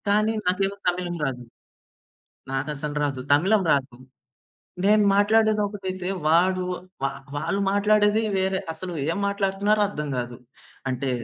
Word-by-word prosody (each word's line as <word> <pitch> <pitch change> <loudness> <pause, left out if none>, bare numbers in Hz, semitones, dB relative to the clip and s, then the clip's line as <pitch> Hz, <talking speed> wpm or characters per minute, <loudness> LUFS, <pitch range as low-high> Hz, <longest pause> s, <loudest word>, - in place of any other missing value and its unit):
కానీ 215 +2 +3
నాకేమో 195 +2 +1
తమిళం 175 0 -1
రాదు. 125 -3 -3 1.1
నాకసలు 145 +2 -3
రాదు. 135 -3 -2
తమిళం 190 +8 +4
రాదు. 135 -2 0 0.9
నేను 210 +1 +5
మాట్లాడేదొకటైతే, 205 -3 +1 0.2
వాడు 180 +4 +3 0.4
వా - - +3 0.3
వాళ్ళు 195 +7 -1
మాట్లాడేది 210 +1 +3 0.2
వేరే 190 0 +1
అసలు 180 +3 -7 0.2
ఏం 170 - -2
మాట్లాడుతున్నారో 200 +1 +1
అర్థం 150 -7 -5
గాదు. 120 -1 -4 0.5
అంటే 130 +1 -2
190 Hz, 110 wpm, -24 LUFS, 150-205 Hz, 1.1 s, నేను